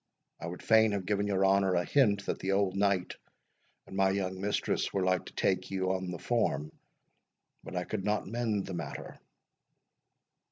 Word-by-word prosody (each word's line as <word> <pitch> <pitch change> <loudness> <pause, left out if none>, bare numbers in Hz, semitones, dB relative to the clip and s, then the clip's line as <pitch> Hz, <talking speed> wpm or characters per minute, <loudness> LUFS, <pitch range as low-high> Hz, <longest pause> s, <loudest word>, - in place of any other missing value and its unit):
I - - -5
would 90 +1 -7
fain 110 -1 +5
have 100 -2 -2
given 100 +1 0
your 95 -1 +2
honour 95 -1 +3
a 85 0 +1
hint 105 -8 +3
that - - -2
the 95 +1 -1
old 95 -1 +1
knight 100 -2 +1 0.7
and - - -10
my 95 0 +3
young 95 -1 -2
mistress 105 +1 0
were 95 - 0
like 90 0 +1
to - - -11
take 95 -1 0
you 95 -1 0
on 95 -1 -2
the 90 - -4
form, 80 - 0 0.9
but 80 - -8
I 90 - 0
could 100 +1 -4
not 105 +1 0
mend 110 -2 -1
the 95 - -6
matter." 85 - -6
95 Hz, 185 wpm, -31 LUFS, 95-100 Hz, 0.9 s, fain